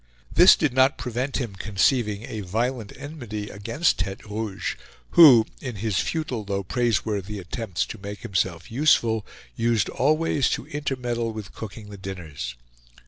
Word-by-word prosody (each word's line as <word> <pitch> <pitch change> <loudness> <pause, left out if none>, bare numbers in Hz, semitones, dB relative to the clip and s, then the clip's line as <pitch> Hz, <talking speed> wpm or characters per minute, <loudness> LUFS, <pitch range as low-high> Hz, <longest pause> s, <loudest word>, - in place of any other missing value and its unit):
This 180 +2 +8
did 150 -6 0
not 130 +1 +4
prevent 125 +3 -3
his 125 - -1
conceiving 105 +1 +1
a 110 -2 -6
violent 115 +3 -2
enmity 120 -8 -6
against 115 +12 0
Tete 95 +2 -3
Rouge, 105 -3 -3 0.4
who, 135 -10 +9 0.2
in 125 -4 -5
his 100 -2 -1
futile 120 - -2
though 100 -1 -2
praiseworthy 105 -2 -1
attempts 95 -1 -3
to 110 - -8
make 100 0 -7
himself 90 -2 -2
useful 115 -5 +3 0.3
used 115 -2 +1
always 150 -1 +2
to - - -9
intermeddle 125 -5 -2
with 110 -2 -8
cooking 105 -1 -8
the 100 - -8
dinners. 80 -10 -6
110 Hz, 140 wpm, -25 LUFS, 100-125 Hz, 0.4 s, who